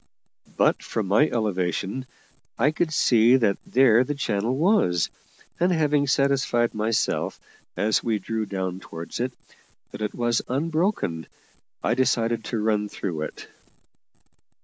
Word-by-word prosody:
But - - +3
from 110 - -3
my 105 +11 +3
elevation 100 +2 -2 0.5
I 140 +6 +3
could 160 +1 -1
see 120 -4 +4
that 110 -6 +2
there 125 -2 +5
the 145 +3 -3
channel 115 -1 -1
was, 140 - +2 0.5
and 180 +2 +3
having 150 -4 +2
satisfied 135 -3 +1
myself, 110 +1 -1 0.4
as 110 +1 +1
we 115 -2 0
drew 110 +2 -3
down 95 -2 -3
towards 85 0 -8
it, 125 +1 -1 0.6
that - - -9
it 105 - -3
was 120 -1 +1
unbroken, 155 - -1 0.6
I - - +2
decided 115 -3 +1
to 115 - -3
run 105 -1 +1
in 105 - -5
through 85 -7 -4
it. 75 - -6
115 Hz, 135 wpm, -24 LUFS, 105-135 Hz, 0.6 s, there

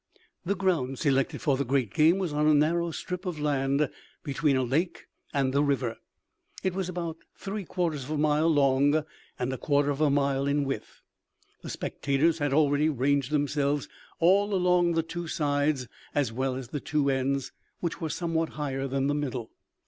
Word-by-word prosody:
The 200 +3 0
ground 165 -9 0
selected 135 -3 +1
for 140 -3 +2
the 140 - 0
great 130 -5 0
game 160 +4 +5
was 180 -6 -2
on 150 +1 +2
a 155 - +6
narrow 170 +3 +2
strip 180 +2 -5
of 170 -4 -3
land 140 0 +1 0.4
between 145 -1 +1
a 130 - +1
lake 150 +9 -1 0.3
and 135 -3 0
the 140 - +3
river. 135 -5 0 0.7
It 185 - 0
was 185 -1 -2
about 170 -2 -4 0.2
three 200 0 -5
quarters 160 -7 -2
of - - -11
a 155 - -1
mile 150 +1 +2
long 145 +1 +3 0.3
and 125 +1 -2
a 130 - -5
quarter 145 -1 +2
of 140 +1 -3
a 155 - +4
mile 140 -1 +1
in 145 +1 +2
width. 135 - -5 0.6
The - - -8
spectators 150 +4 0
had 145 -1 0
already 145 +1 +3
ranged 140 -1 +1
themselves 145 -1 0 0.3
all 195 +4 +4
along 180 -1 +3
the 165 0 +1
two 170 +1 -5
sides, 145 -3 0 0.3
as 135 -6 +1
well 130 +1 -1
as 130 0 -5
at 120 - -18
the 145 - -2
two 145 -1 +1
ends, 135 0 -1 0.3
which 170 0 -3
were 160 - -2
somewhat 165 -1 -1
higher 135 -2 -2
than 135 0 -1
the 145 - +1
middle. 130 -6 -3
145 Hz, 185 wpm, -28 LUFS, 135-165 Hz, 0.7 s, a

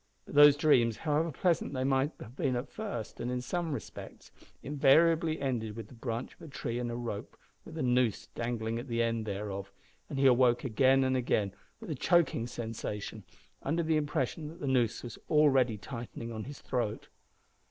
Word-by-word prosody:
But - - -11
those 145 0 +8
dreams, 120 -7 +4
however 155 +3 0
pleasant 170 +1 0
they 130 - 0
might 135 +2 +1 0.2
be 140 - 0
at 125 +1 -2
first 200 - -5
and 120 - -3
in 125 0 -1
some 165 +7 -2
respects, 140 - -8 0.3
invariably 160 +3 +4
ended 115 -6 -2
with 115 -2 -8
the - - -13
branch 115 0 -4
of - - -23
a - - -9
tree 120 -4 -4
and 120 -1 -2
a 120 - -3
rope 115 -4 -5 0.3
with - - -9
a - - -1
noose 125 -3 +2
dangling 115 -1 -2
at 125 - -7
the 115 -1 +1
end 115 -1 -1
thereof, 100 -1 -4 0.4
and 140 - -4
he 135 - +2
awoke 125 -2 +5
again 130 +2 +4
and 130 0 +1
again 105 -5 0 0.3
with - - -7
a - - -1
choking 150 -6 +2
sensation, 110 -3 -5 0.4
under 165 +4 0
the 160 0 +1
impression 150 0 -1
that 160 +3 -10
the - - -4
noose 125 -4 +1
was 120 -3 -8
already 135 -7 +4
tightening 115 0 -7
on 110 -2 -5
his 140 +1 -9
throat. 120 -4 -2
125 Hz, 185 wpm, -31 LUFS, 115-145 Hz, 0.4 s, those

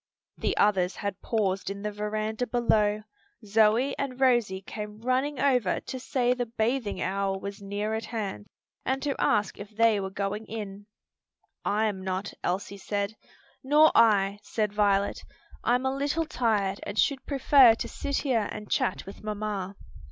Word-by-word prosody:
The - - -2
others 190 -3 +3
had 200 -2 -4
paused 195 -4 -1
in 200 0 -6
the 210 - -2
veranda 215 +3 -2
below. 215 -3 +2 0.4
Zoe 220 +6 +3
and 265 -2 -3
Rosie 240 -8 +3
came 210 +1 -7
running 255 +4 0
over 250 -9 +2
to 260 - -7
say 250 -1 +1
the 245 -1 -3
bathing 225 -2 -1
hour 195 +1 -1
was 200 +1 -7
near 205 +2 -3
at 220 0 -2
hand, 205 - -4 0.4
and 265 +1 0
to 285 -2 0
ask 210 -2 +1
if 200 0 -8
they 220 -1 +3
were 190 -1 -3
going 200 +2 -3
in. 205 -2 -7 0.8
"I 215 +2 +1
am 195 -3 -2
not," 190 +1 -3
Elsie 200 +2 -2
said. 200 +1 -2 0.5
"Nor 300 +3 +6
I," 205 -3 +4
said 210 -1 -2
Violet, 200 -1 +2 0.4
"I'm 250 +2 +2
a 265 0 0
little 290 +4 0
tired 210 -9 0
and 200 - -6
should 275 +2 +2
prefer 270 -4 +6
to - - -4
sit 280 -1 -3
here 230 -6 +1
and 210 -1 -8
chat 185 - 0
with 195 - -11
mamma." 205 -2 -3
215 Hz, 160 wpm, -27 LUFS, 200-245 Hz, 0.8 s, Nor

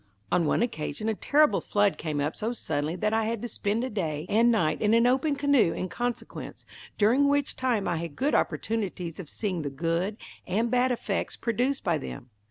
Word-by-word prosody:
On 170 -3 +3
one 220 - +2
occasion 155 -2 -3
a - - +1
terrible 295 +7 +3
flood 205 -1 +1
came 155 -3 -2
up 145 +2 -1
so 225 +3 -2
suddenly 155 -7 -2
that 210 +4 0
I 225 0 +2
had 230 0 -1
to - - -2
spend 215 +1 -1
a 260 - -2
day 160 -7 -2
and 230 +3 +4
night 155 -9 +1
in 215 +1 +4
an 230 +1 +4
open 270 +4 +2
canoe 280 -11 +3
in 185 - -4
consequence, 245 0 -5 0.3
during 245 +7 +4
which 285 -1 +1
time 245 -6 0
I 175 -1 0
had 165 -3 -5
good 285 +3 0
opportunities 190 -7 -1
of 165 -6 -7
seeing 190 -6 -2
the 145 - -3
good 165 +8 -1 0.3
and 220 +6 0
bad 250 +1 +3
effects 210 -4 -2
produced 250 +4 0
by 170 -4 +1
them. 130 -2 -8
210 Hz, 200 wpm, -27 LUFS, 170-240 Hz, 0.3 s, and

